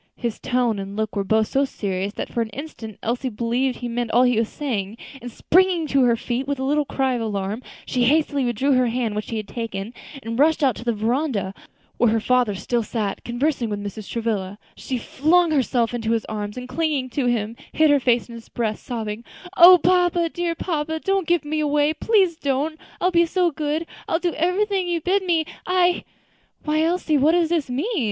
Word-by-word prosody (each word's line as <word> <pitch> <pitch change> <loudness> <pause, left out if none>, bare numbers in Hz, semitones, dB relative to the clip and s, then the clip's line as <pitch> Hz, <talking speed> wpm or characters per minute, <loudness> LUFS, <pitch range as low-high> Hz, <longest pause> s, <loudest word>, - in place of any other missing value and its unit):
His 235 -3 -4
tone 245 -4 0
and 195 +1 -6
look 220 -1 -2
were 200 - 0
both 220 +3 +2
so 275 - +2
serious 200 -6 -3
that - - -6
for 235 - 0
an 225 - -2
instant 225 -4 -8
Elsie 245 +3 -1
believed 245 +3 -1
he 245 - -5
meant 240 0 -2
all 240 +3 +4
that 250 - +4
he 235 -3 +2
was 225 - 0
saying, 220 -7 -3 0.2
and 245 0 -7
springing 360 +4 +2
to 275 0 +3
her 235 -1 +4
feet 245 +3 -3
with 285 0 -1
a 265 - -3
little 295 +2 +1
cry 265 -1 0
of 240 - -2
alarm, 205 0 -3 0.2
she 250 -2 +1
hastily 285 0 +2
withdrew 245 +3 0
her 255 -2 +3
hand 230 -2 -1
which 210 - -4
he 225 - -3
had 215 -2 -5
taken, 225 -2 -5 0.3
and 230 +2 -4
rushing 305 -1 +4
out 255 - 0
to - - -8
the 240 - +1
veranda, 225 -2 -1 0.4
where 240 - +4
her 225 +1 +2
father 245 -2 +2
still 235 +6 -1
sat 215 -2 -3
conversing 240 0 -1
with 205 - -2
Mrs. 205 0 -7
Travilla, 210 -4 -2 0.2
she 260 - -4
flung 320 +8 +2
herself 250 -5 +1
into 225 -1 -1
his 225 - -1
arms, 210 0 -5
and 250 0 -6
clinging 280 -1 -1
to 265 -1 0
him, 230 -2 -1 0.2
hid 310 -1 +4
her 290 - +5
face 245 -2 +1
on 235 - -11
his 230 -1 -11
breast, 220 -3 -3
sobbing, 225 -2 -4 0.3
"O 360 0 +10
papa, 355 -1 +2
dear 345 0 -2
papa! 320 -2 -2
don't 390 -1 0
give 345 -3 +2
me 310 +1 -1
away; 295 0 +2
please 375 -1 +2
don't 290 +3 -1 0.2
I - - -1
will 365 - +3
be 340 -1 +4
so 355 0 +1
good 305 +2 -2 0.2
I - - -3
will 325 - +3
do 350 -1 -1
everything 375 +3 0
you 345 -1 0
bid 375 +5 +1
me 335 -3 +1 0.2
I 360 -1 +2 0.3
" - - -39
"Why, 305 0 +1
Elsie, 325 -2 +1
what 305 +4 +4
does 340 -2 +2
all 345 - +4
this 280 - -9
mean!" 345 - -1
255 Hz, 220 wpm, -22 LUFS, 225-315 Hz, 0.4 s, O